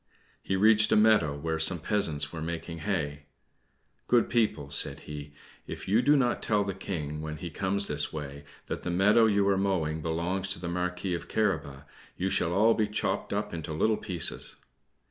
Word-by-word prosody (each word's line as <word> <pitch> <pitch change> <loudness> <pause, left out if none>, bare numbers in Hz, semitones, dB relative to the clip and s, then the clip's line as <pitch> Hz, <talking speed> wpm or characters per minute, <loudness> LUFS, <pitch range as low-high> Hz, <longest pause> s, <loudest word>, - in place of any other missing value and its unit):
He 95 - -1
reached 110 +2 +5
a - - +5
meadow 105 -9 +4
where 80 +2 -2
some 80 +3 +1
peasants 80 -4 0
were 80 - -5
making 85 0 -5
hay. 75 -6 -3 0.8
"Good 120 -2 +3
people," 105 - 0
said 70 - -2
he, 75 -1 -8 0.3
"if - - -7
you 105 +5 +4
do 145 +4 +4
not 125 -4 +1
tell 105 -2 +2
the 100 -1 -3
King, 75 -6 -5
when 75 0 -5
he 85 0 -6
comes 100 +4 +1
this 75 -3 -1
way, 70 -2 -7 0.2
that - - -4
the - - -4
meadow 105 +6 +4
you 100 -2 +2
are 100 -1 +3
mowing 80 -6 0
belongs 85 +4 -2
to 95 - -2
the 85 - -5
Marquis 90 +1 -2
of 85 - -4
Carabas, 80 -10 -1 0.3
you 95 +1 -1
shall 85 - +1
all 110 +5 +4
be 110 -2 +1
chopped 105 -1 -2
up 105 -1 -2
into 80 -1 -5
little 110 +8 +2
pieces." 90 -5 -3
90 Hz, 185 wpm, -28 LUFS, 80-105 Hz, 0.8 s, reached